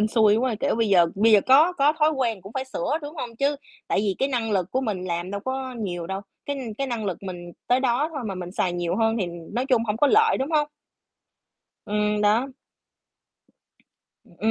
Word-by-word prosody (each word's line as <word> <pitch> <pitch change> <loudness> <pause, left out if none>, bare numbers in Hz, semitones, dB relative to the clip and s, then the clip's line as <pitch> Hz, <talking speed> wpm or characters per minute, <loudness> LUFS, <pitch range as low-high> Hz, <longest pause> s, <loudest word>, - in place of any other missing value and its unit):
hên 215 - +3
xui 215 -2 +4
quá, 245 -1 0
kiểu, 280 - +1
bây 225 -2 +1
giờ 175 -3 +5
bây 220 +3 +4
giờ 205 - +7
có 300 +7 +6
có 295 -2 +3
thói 305 +1 +4
quen 235 -9 -1
cũng 195 +3 -11
phải 265 -1 -3
sửa, 265 - -2
đúng 295 +3 -7
hông? 240 -5 -6
Chứ 280 +2 +1 0.3
tại - - +1
vì 200 -2 +1
cái 270 - +1
năng 235 -4 -1
lực 185 -2 0
của 260 - 0
mình 205 -7 -3
làm 175 +1 -3
đâu 200 0 -4
có 260 -1 -3
nhiều 175 -7 -4
đâu, 190 +1 -4 0.3
cái 285 0 -2 0.2
cái 275 - -1
năng 235 -4 -3
lực 190 -4 -3
mình 175 -2 -7
tới 250 +1 +3
đó 265 +4 +1
thôi 280 - -3
mà 195 - -3
mình 180 -1 -6
xài 180 -3 0
nhiều 175 0 -2
hơn 225 0 +2
thì, 185 - 0 0.3
nói 250 +3 -1
chung 250 -4 +3
hổng 210 -1 -1
có 290 - +4
lợi, 440 +6 +4
đúng 270 +4 -2
không? 295 -1 +2 1.2
Ừm, 210 0 0
đó. 220 +6 +3 1.8
Ừm, 170 - -22
225 Hz, 225 wpm, -24 LUFS, 195-265 Hz, 1.8 s, giờ